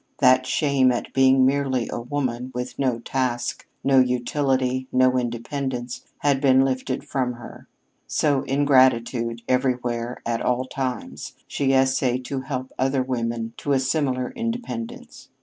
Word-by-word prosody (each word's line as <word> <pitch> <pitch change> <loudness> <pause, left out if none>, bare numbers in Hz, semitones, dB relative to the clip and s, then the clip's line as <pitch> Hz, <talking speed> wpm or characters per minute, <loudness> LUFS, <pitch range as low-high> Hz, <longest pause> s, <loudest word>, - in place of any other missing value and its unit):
That 130 -1 +4
shame 135 -2 +3
at 120 - -3
being 130 0 +5
merely 135 -3 +1
a - - -3
woman, 125 -1 -3
with 125 0 -5
no 130 -4 +1
task, 125 -2 -2 0.2
no 135 -1 +5
utility, 130 0 +1
no 130 0 +4
independence, 125 +1 -3
had 140 -2 +1
been 130 -2 +5
lifted 130 -1 -2
from 125 -2 -1
her. 120 0 -12 0.4
So, 145 -3 +1
in 140 +2 +1
gratitude, 120 -3 +3
everywhere, 125 -2 -1
at 115 -1 -1
all 125 +1 0
times, 130 -1 -5
she 135 -1 0
essayed 130 -1 +2
to 135 0 -3
help 130 -1 -5
other 135 0 +1
women 115 -2 -3
to 145 - -1
a 135 - +3
similar 130 -2 0
independence. 240 0 -6
130 Hz, 140 wpm, -23 LUFS, 125-135 Hz, 0.4 s, being